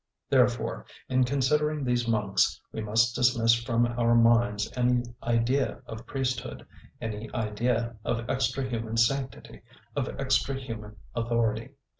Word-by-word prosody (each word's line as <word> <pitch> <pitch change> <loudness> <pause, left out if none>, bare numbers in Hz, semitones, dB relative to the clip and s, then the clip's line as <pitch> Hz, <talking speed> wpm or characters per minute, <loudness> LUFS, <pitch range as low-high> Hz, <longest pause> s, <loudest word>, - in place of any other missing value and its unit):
Therefore, - - +2 0.2
in 130 -1 +3
considering 150 +3 +1
these 120 -2 0
monks, 105 -3 +1
we 110 - -4
must 110 +2 +2
dismiss 120 -2 +4
from 115 0 +1
our 120 0 +2
minds 115 -2 +4
any 125 -1 +2 0.2
idea 120 +4 0
of 110 +1 -9
priesthood, 135 -3 -3 0.3
any 110 0 -5
idea 115 +1 -1
of 120 0 -2
extra 130 +1 0
human 115 -2 -3
sanctity, 130 +1 -1 0.3
of - - 0
extra 135 0 +1
human 110 -5 -7 0.2
authority. 115 +1 -1
120 Hz, 125 wpm, -28 LUFS, 115-130 Hz, 0.3 s, dismiss